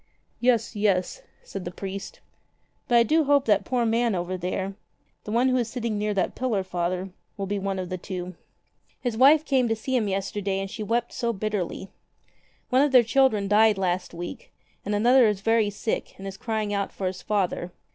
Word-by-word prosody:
"Yes, 235 -2 +2
yes," 205 - 0 0.2
said 195 - -7
the 175 - -4
priest. 195 +2 -7 0.7
"But 240 -3 +4
I 235 - +7
do 315 +7 +2
hope 285 -1 +3
that 205 -2 +3
poor 245 -2 0
man 230 -1 +1
over 175 +1 -2
there 185 +2 -3 0.3
— - - -44
the 210 - -5
one 240 +4 +3
who 255 - +2
is 235 -2 -1
sitting 225 -3 -3
near 210 0 0
that 185 - 0
pillar. 235 -7 -1
Father 180 +1 -2
— - - -46
will 200 - -2
be 200 +1 -2
one 195 0 -2
of 185 -1 -4
the 185 -1 -4
two. 180 0 -6 0.7
His 245 -3 -2
wife 290 +6 +6
came 260 -4 +2
to 225 - +1
see 260 +4 -3
him 225 -4 +1
yesterday 195 0 -2
and 195 0 -4
she 220 - -6
wept 235 +3 -1
so 235 -1 -1
bitterly. 195 -2 -3 0.8
One 255 +1 +5
of 290 -1 +3
their 250 -2 +7
children 230 -4 +2
died 210 +1 +4
last 185 -1 -1
week, 175 +1 -8 0.3
and 205 +1 -1
another 240 +3 +5
is 205 -2 -1
very 225 -1 +2
sick 205 +2 -3
and 195 - -9
is 195 -1 -6
crying 220 -2 -2
out 200 -1 -1
for 195 - -5
his 185 0 -3
father. 185 -3 -1
210 Hz, 205 wpm, -25 LUFS, 190-235 Hz, 0.8 s, I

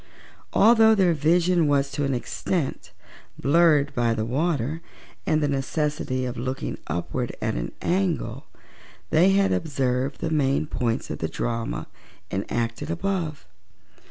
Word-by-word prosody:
Although 220 0 +6
their 185 -4 +4
vision 170 +2 +3
was 140 -1 +2
to 145 +1 -2
an 135 -1 0
extent 150 +5 -3 0.5
blurred 145 0 +4
by 120 -2 +1
the 110 -1 -1
water 150 +3 -1 0.5
and 155 -1 +2
the - - +2
necessity 140 -1 -1
of 125 -1 -4
looking 130 +3 -4
upward 85 +2 -3
at - - -1
an - - -3
angle, 180 -2 -1 0.6
they 170 +5 +5
had 195 0 +3
observed 135 -3 -1
the 165 - -2
main 140 -2 +2
points 120 -6 -2
of - - -5
the - - -2
drama 115 -1 -3 0.5
enacted 115 +8 -2
above. 165 - -2
145 Hz, 130 wpm, -25 LUFS, 125-170 Hz, 0.6 s, Although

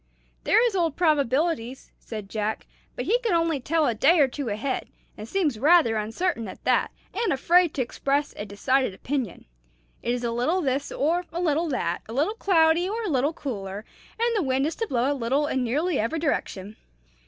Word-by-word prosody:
"There 460 - +5
is 460 -5 0
Old 335 -5 +1
Probabilities," 285 -4 0
said 215 -3 -7
Jack; 215 +1 -3 0.3
"but - - -4
he 475 +3 +2
can 465 -6 -1
only 330 -3 +1
tell 315 +4 +1
a 240 - +2
day 275 +11 +4
or 285 - +6
two 265 -1 -4
ahead, 220 +6 -2 0.3
and 215 +1 -9
seems 310 - 0
rather 300 -4 +5
uncertain 225 - -2
at 185 - -10
that, - - +2 0.2
and 445 +4 0
afraid 340 +5 +3
to 260 - +1
express 280 +4 -1
a - - -5
decided 210 +3 0
opinion. 250 -4 -4 0.6
It 240 - 0
is 245 - -5
a 235 - -1
little 250 +10 +1
this 275 -4 -1
or 340 +5 0
a 340 - -4
little 330 -1 +1
that, 175 - -1
a - - -6
little 300 - +1
cloudy 345 -4 +3
or 455 +3 -3
a 420 - -2
little 280 0 +1
cooler, 205 -8 -5 0.3
and 470 0 +1
the 420 - +2
wind 265 -2 +1
is 315 - -1
to 455 - -2
blow 255 -2 +1
a - - +2
little 270 +3 0
in 265 -3 -1
nearly 295 +7 0
every 230 +9 -1
direction. 215 - -2
280 Hz, 200 wpm, -25 LUFS, 235-335 Hz, 0.6 s, or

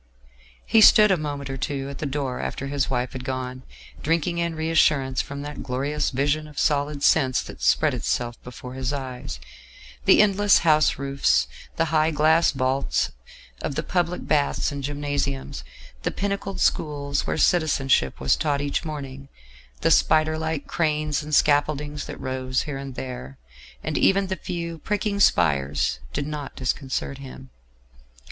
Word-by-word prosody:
He 225 - +4
stood 210 -1 +8
a - - +5
moment 145 -4 -4
or 135 0 -4
two 135 0 -3
at 140 -1 -7
the 150 - -2
door 135 -2 -3
after 140 - -4
his 140 0 -1
wife 125 -1 -1
had 130 -1 -6
gone, 130 -1 -4 0.4
drinking 170 +2 0
in 170 -1 -1
reassurance 150 -5 +2
from 140 0 -7
that 150 0 -7
glorious 140 +3 -1
vision 145 +3 0
of 150 -2 -15
solid 145 0 0
sense 130 -5 +4
that - - -11
spread - - +3
itself 120 -1 -2
before 125 0 -9
his 130 0 -2
eyes: 125 - -5 0.7
the - - +6
endless 205 0 +5
house 155 -2 +4
roofs; 140 +1 +1 0.3
the 165 - +1
high 155 0 +4
glass 160 +2 +4
vaults 135 0 0 0.5
of 140 - -3
the - - -1
public 175 -1 -1
baths 145 -1 +1
and 140 -1 -5
gymnasiums; 145 -1 -3 0.4
the - - -1
pinnacled 200 -1 -3
schools 140 -2 0
where - - -1
Citizenship 140 - +2
was 65 - +3
taught 145 -2 0
each 145 0 -1
morning; 140 -3 -7 0.5
the - - +3
spider 155 0 +4
like 160 -2 -3
cranes 155 -2 0
and 150 0 -1
scaffoldings 145 0 +1
that - - -8
rose 130 0 -2
here 140 -3 -5
and 135 -2 -7
there; 70 - -7 0.5
and - - -1
even 195 0 +3
the 190 0 -2
few 170 -2 -5
pricking 205 +2 -1
spires 70 - +2
did 140 - -2
not 150 -2 -6
disconcert 135 +1 -3
him. 130 -1 -11
145 Hz, 155 wpm, -24 LUFS, 130-155 Hz, 0.7 s, stood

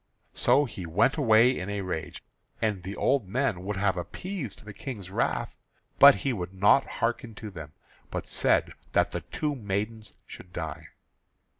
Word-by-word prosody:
So 145 - +3
he 95 -8 -7
went 105 - +3
away 120 -2 +5
in 90 +2 -4
a 100 0 -2
rage; 80 -5 -5 0.4
and 105 -4 0
the 95 +2 -6
old 135 -8 +1
men 110 -4 -1
would 105 +2 -3
have 95 -1 +1
appeased 135 - -6
the 105 - -8
King's 100 -7 -7
wrath, - - -1 0.4
but 140 0 +10
he 135 - +2
would 95 -3 -5
not 105 +8 +4 0.2
hearken 115 -1 -1
to 105 0 -8
them, 75 -5 -9 0.4
but - - -4
said - - +2 0.2
that - - +3
the - - -3
two 150 -1 -3
maidens 110 -1 -4
should 90 - -12
die. 80 -5 -5
105 Hz, 165 wpm, -28 LUFS, 95-125 Hz, 0.4 s, but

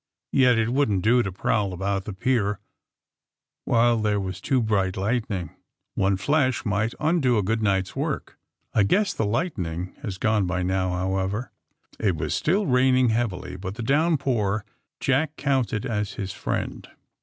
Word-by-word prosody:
^*Yet 125 -3 +5
it 115 0 +1
wouldn't 110 -9 +1
do 120 +3 +4
to 100 - -3
prowl 100 +1 0
about 95 +1 -2
the 105 - -5
pier 105 -1 0 1.1
while 120 0 +3
there 105 -1 +1
was 95 -1 -5
too 135 +2 +1
bright 100 -5 0
lightning. 100 -4 -1 0.4
One 95 -1 +1
flash 130 +3 +1
might 105 +2 0
undo 150 -7 +2
a 105 - +1
night 100 -2 +1
^s - - -15
good - - -6
work. - - -3 0.3
I 105 - +4
guess 190 - +2
the 110 - -1
lightning 95 - -2
has 100 -8 -5
gone 105 -2 +1
by 90 +1 -1
now, 95 0 0
however. 95 +5 -2 0.2
' - - -50
' - - -26
It 100 -5 +1
was 75 -1 -2
still 195 +6 +1
raining 130 -2 +4
heavily, 105 -6 -2
but 95 +1 -6
the 115 - -5
downpour 130 -8 +1 0.3
Jack 145 +3 +1
counted 130 -6 0
as 105 -5 -2
his 95 -2 -4
friend. - - -4
110 Hz, 165 wpm, -25 LUFS, 95-125 Hz, 1.1 s, ^*Yet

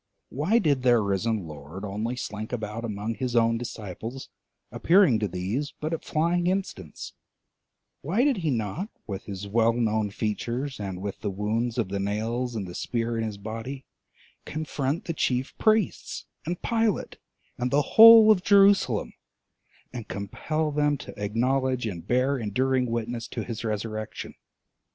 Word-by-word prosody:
Why 155 - +1
did 145 - +2
their 120 -2 +5
risen 100 0 0
Lord 75 +5 -8
only 105 +5 -3
slink 110 -3 -5
about 110 -1 -4
among 105 0 -3
his 125 +1 -3
own 115 0 +3
disciples, 115 +2 -7 0.4
appearing 170 - +4
to 105 - 0
these 100 - -3
but 155 +2 -3
at 165 - -3
flying 170 +3 +1
instants: 180 - -3 0.9
why 190 - +1
did 280 -4 +3
he 165 -4 -1
not, 125 - -2 0.2
with 100 -2 -6
his 100 0 -6
well 115 +2 +3
known 110 -3 0
features 120 +6 -3
and 95 -2 -5
with 100 -1 -4
the 105 - -1
wounds 110 +5 -1
of 110 -6 0
the 100 0 -2
nails 115 +5 -2
and 105 -3 -3
the 90 - -8
spear 115 +4 -2
in 115 - -1
his 110 -2 -4
body, 115 +6 -6 0.6
confront 150 0 -3
the 165 - -2
chief 130 -3 -1
priests 215 -3 +1 0.2
and 175 +1 -3
Pilate 225 -3 0 0.4
and 125 0 0
the 145 +3 +3
whole 225 -1 +10
of 195 -4 +3
Jerusalem, 195 - +4 0.8
and 120 -4 -6
compel 150 +10 -2
them 145 0 +1
to 105 - -8
acknowledge 130 +4 0
and 90 -4 -5
bear 130 +2 +2
enduring 125 +4 +1
witness 115 0 -3
to - - -4
his 115 -1 -6
resurrection? 110 0 -4
120 Hz, 155 wpm, -26 LUFS, 105-145 Hz, 0.9 s, whole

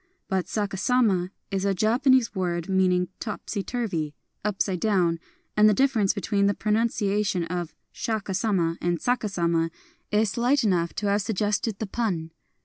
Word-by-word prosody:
But 190 -2 -1
saha 200 -3 -2
sama 205 -7 +2 0.2
is 195 -1 -1
a 200 -1 +1
Japanese 240 +4 +3
word 175 -3 -2
meaning 185 -2 +2
" - - -47
topsy 210 -1 -4
turvy," 185 -11 -3
" - - -48
upside 195 -3 0
down; 175 -5 +2 0.2
" - - -43
and 210 0 +6
the 210 - +3
dif 270 +4 +3
ference 210 -4 +2
between 200 0 +1
the 200 - +1
pronunciation 210 -3 +1
of 175 -1 -4 0.2
Shaka 215 -3 -3
Sama 185 -4 0
and 175 -1 0
saka 245 0 0
sama 170 -3 +1 0.4
is 210 -1 +2
slight 245 +6 +2
enough 175 -5 +1
to 210 - -3
have 205 +1 +2
suggested 210 +1 -1
the 220 - -3
pun. 190 -7 -2
200 Hz, 170 wpm, -26 LUFS, 180-220 Hz, 0.4 s, and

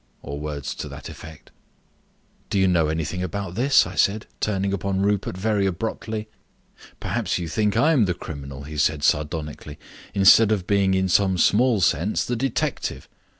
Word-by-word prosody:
or 70 +1 -6
words 75 -2 -4
to - - -6
that - - -9
effect. 80 -1 -12 1.0
"Do - - -1
you 95 -1 +4
know 85 -4 +3
anything 80 +3 -2
about 95 0 -4
this?" 130 +7 +4
I - - -7
said, 105 +2 +1
turning 100 -1 -1
upon 95 0 -1
Rupert 100 -2 0
very 100 0 +1
abruptly. 110 +3 -4 0.7
"Perhaps - - -1
you 85 -2 -4
think 105 +3 0
I 160 - +4
am 130 -9 +4
the 90 -2 -1
criminal," 70 -4 -8
he 75 +1 -8
said 75 0 +1
sardonically, 75 -1 -1 0.4
"instead 105 +2 +6
of 100 -5 0
being 100 -1 +2
in 95 0 +1
some 95 0 +2
small 110 +4 +3
sense 85 +4 +1
the 125 - -2
detective. 130 +1 -2
95 Hz, 165 wpm, -23 LUFS, 80-105 Hz, 1.0 s, instead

